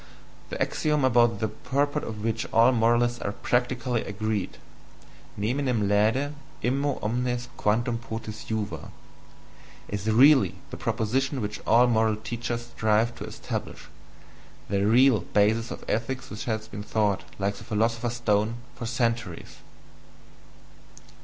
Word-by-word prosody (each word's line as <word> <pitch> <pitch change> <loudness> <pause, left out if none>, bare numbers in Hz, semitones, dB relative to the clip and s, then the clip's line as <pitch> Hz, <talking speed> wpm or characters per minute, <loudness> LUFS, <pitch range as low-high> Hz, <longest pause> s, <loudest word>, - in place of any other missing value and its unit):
] - - -25
"the - - -5
axiom 150 -3 +1
about 120 -3 +4
the 110 - 0
purport 135 +6 -1
of 105 -1 -6
which 115 0 -1
all 115 +3 +6
moralists 120 0 +2
are 100 - -2
PRACTICALLY 125 0 0
agreed: 105 -1 -3 0.8
neminem 120 0 0
laede, 110 +8 +2 0.3
immo 135 +2 +1
omnes 120 +2 -1
quantum 115 +3 +1
potes 110 -2 -7
juva 105 -8 -4 1.0
is 105 +1 -2
REALLY 135 +5 +6 0.2
the - - -5
proposition 130 +5 -1
which 105 -2 -4
all 120 +2 +6
moral 110 -2 +2
teachers 120 +2 -4
strive 110 +2 +2
to - - -7
establish,... - - -6 0.8
the 100 0 +1
REAL 125 +1 +5 0.2
basis 110 +3 +3
of - - -7
ethics 120 +4 -2
which 105 - -6
has 110 -2 -2
been 105 +1 -7
sought, 105 -5 0
like 100 0 0
the - - -10
philosopher's 115 +2 0
stone, 110 -1 +1 0.2
for 115 - -6
centuries." 115 -6 -2
115 Hz, 130 wpm, -26 LUFS, 105-120 Hz, 1.0 s, all